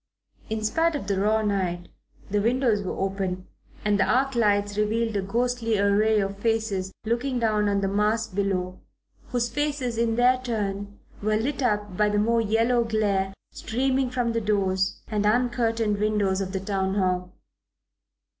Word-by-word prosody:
In 220 0 -2
spite 325 +9 +1
of 280 - -4
the 200 -1 0
raw 215 +2 +2
night 185 -4 -1 0.4
the 205 +1 0
windows 235 -1 +2
were 190 - -4
open 190 -1 -2 0.4
and 205 -1 +2
the - - +5
arc 270 +2 +2
lights 205 -3 +2
revealed 220 +1 0
a 200 - +1
ghostly 230 +2 0
array 205 +2 +3
of 195 0 -2
faces 220 -4 -1
looking 245 +3 -1
down 215 -3 +1
on 200 0 +1
the 195 - 0
mass 210 +3 +1
below, 185 -3 -2 0.5
whose 240 -1 0
faces 280 -4 -2
in 230 -1 +1
their 250 +2 +4
turn 205 -4 -3 0.2
were 215 +1 +1
lit 275 +6 -2
up 210 -5 0
by 210 +2 +2
the 205 - 0
more 230 +2 +2
yellow 230 +3 +2
glare 205 -4 0 0.2
streaming 260 +2 0
from 245 -2 -1
the 230 0 -1
doors 195 -2 0
and 210 -2 -1
uncurtained 230 -2 +1
windows 205 -2 +1
of 190 -1 -3
the 190 - -2
Town 190 -1 -1
Hall. 180 -2 0
210 Hz, 165 wpm, -25 LUFS, 200-235 Hz, 0.5 s, the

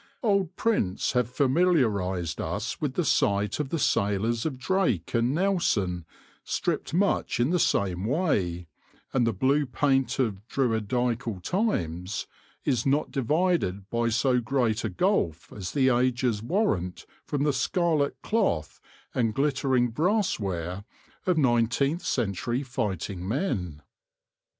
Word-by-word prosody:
Old 200 -5 +1
prints 145 - 0
have 125 -2 +1
familiarised 125 - +1
us - - -3
with - - -2
the - - 0
sight 100 +1 +1
of 150 -3 -2
the 165 - -1
sailors 110 0 +1
of 135 -5 -4
Drake 130 - 0
and 120 +4 +2
Nelson 115 - +1 0.4
stripped - - -2
much 190 -3 +1
in 125 +6 +2
the 180 - +2
same 95 - +1
way; 105 - 0 0.5
and 125 -3 +2
the - - +3
blue 135 +8 +1
paint 135 0 +1
of 110 -7 -1
Druidieal 115 -3 -1
times 100 - -1 0.4
is 125 -5 +1
not 140 +2 +1
divided 140 - 0
by 115 0 +1
so 125 +2 +2
great 120 -2 0
a - - -1
gulf 180 - 0
as 95 -3 -5
the 130 -2 +3
ages 125 -3 +1
warrant 115 - -1 0.2
from 145 -1 -1
the 145 -1 +2
scarlet 150 +2 +1
cloth 195 - 0 0.3
and 115 -4 0
glittering 135 -4 +1
brass 185 - +1
ware 90 -1 -3 0.4
of 180 -3 +3
nineteenth 135 +4 +2
century 120 +3 -1
fighting 95 - -3
men. 95 - -2
125 Hz, 130 wpm, -27 LUFS, 100-150 Hz, 0.5 s, the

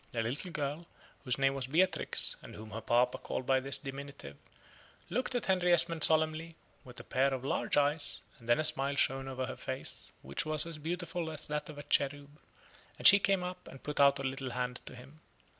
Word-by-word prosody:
The 115 -2 -1
little 135 +10 -2
girl, 150 +1 -4 0.4
whose 125 -3 0
name 135 0 +2
was 135 -2 -4
Beatrix, 175 +7 +1
and - - -11
whom 110 0 -10
her 110 +3 -5
papa 120 +2 +2
called 130 - -4
by 135 0 +3
this 135 +1 +2
diminutive, 140 - -8 0.8
looked 250 +2 -1
at 245 - -1
Henry 180 -2 +2
Esmond 165 -2 +4
solemnly, 160 +1 +2 0.3
with 125 -1 -12
a - - -9
pair 135 +1 +1
of 130 -1 -4
large - - 0
eyes, 145 +1 +2 0.2
and 115 0 -13
then 120 - +5
a - - +1
smile 140 -2 +3
shone 135 -1 +1
over 130 -1 -3
her 130 - -6
face, 130 0 -4
which 70 +2 -1
was 155 0 +3
as 165 -2 -6
beautiful 170 +1 -3
as 155 -2 -3
that 150 0 -3
of 150 - -9
a 145 - -7
cherub, 145 +1 -1 0.6
and - - -10
she 200 - +11
came 195 -2 +1
up 180 0 -7
and 135 - -12
put 150 -1 -4
out 140 0 +6
a 135 - -5
little 130 0 -3
hand 125 0 -3
to - - -7
him. 135 +5 -14
140 Hz, 210 wpm, -32 LUFS, 130-160 Hz, 0.8 s, she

